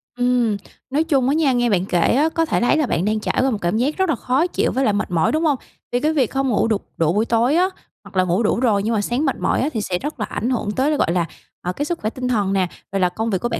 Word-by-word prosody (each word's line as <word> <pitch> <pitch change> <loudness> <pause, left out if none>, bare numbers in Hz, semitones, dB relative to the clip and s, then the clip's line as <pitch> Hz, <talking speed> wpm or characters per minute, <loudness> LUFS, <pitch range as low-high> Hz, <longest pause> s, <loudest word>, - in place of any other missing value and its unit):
Ừm, 245 -4 +1 0.3
nói 295 +4 +1
chung 270 -6 +1
á 280 - +2
nha, 305 -4 +3
nghe 240 -1 +2
bạn 190 -2 +1
kể 175 -3 0 0.2
á 300 +4 +3
có 330 0 0
thể - - 0
thấy 245 +6 +3
là 305 - +2
bạn 175 -4 -1
đang 215 0 +1
trải - - -2
qua 265 0 +2
một 220 - -1
cảm 175 +5 0
giác 275 +6 0
rất 380 -3 +1
là 310 - +2
khó 260 +8 +1
chịu - - 0
với 265 - 0
lại 210 - +2
mệt 205 -2 -2
mỏi, 165 -2 +2
đúng 315 +2 0
hông? 290 -3 +2 0.3
Vì 245 - +1
cái 305 +3 +1
việc 265 -7 +1
không 270 0 0
ngủ 225 - +2
đủ 215 -3 +2 0.2
đủ 165 +1 +2
buổi 215 +2 +1
tối 235 +6 +2
á, 365 +2 +3 0.3
hoặc - - -15
là 185 - +4
ngủ 180 +5 +1
đủ 220 - +1
rồi 210 -6 +2
nhưng 230 - 0
mà 210 - +1
sáng 245 +8 -1
mệt 270 - +1
mỏi - - +1
á 280 - +1
thì 220 - -1
sẽ 180 -3 -1
rất 295 -4 -5
là 210 - -1
ảnh 240 - -3
hưởng 225 -5 -1
tới 265 +7 +1
là, 300 - +1
gọi 165 - +1
là, 175 -1 +1 0.4
ờ, 180 +1 -3
cái 290 - -3
sức 340 +1 -3
khỏe 215 - -1
tinh 250 +1 -4
thần 205 -5 +1
nè, 190 -2 +2 0.2
rồi 195 - -1
là 180 -1 +3
công 220 +5 -3
việc 190 -4 0
của 240 - -1
bạn - - -2
240 Hz, 325 wpm, -21 LUFS, 205-280 Hz, 0.4 s, là